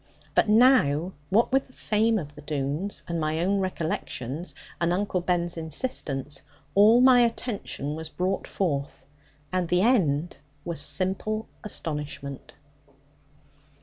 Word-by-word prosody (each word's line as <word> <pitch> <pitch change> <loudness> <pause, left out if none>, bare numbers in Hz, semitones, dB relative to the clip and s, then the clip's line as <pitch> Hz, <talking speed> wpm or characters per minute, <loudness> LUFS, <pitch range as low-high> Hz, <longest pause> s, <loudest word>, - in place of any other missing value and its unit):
But - - +3
now, 210 - +4 0.2
what 220 +7 +3
with 270 +1 +2
the 255 - -21
fame 220 0 +1
of 150 -6 -5
the 150 - -12
Doones, 150 +6 -2
and 170 -1 -2
my 155 +1 0
own 195 +4 +1
recollections, 165 -4 -3 0.3
and 170 0 +2
Uncle 185 0 0
Ben's 175 -1 -1
insistence, 150 - -3 0.3
all 215 +4 +6
my 255 -1 +7
attention 230 - -1
was 160 0 -6
called 185 +4 -2
forth, 140 -7 -2 0.5
and 180 -2 +1
the 180 +2 +2
end 175 - +2 0.3
was 170 -4 -2
simple 195 +7 0 0.2
astonishment. 150 - -5
180 Hz, 125 wpm, -26 LUFS, 150-210 Hz, 0.5 s, my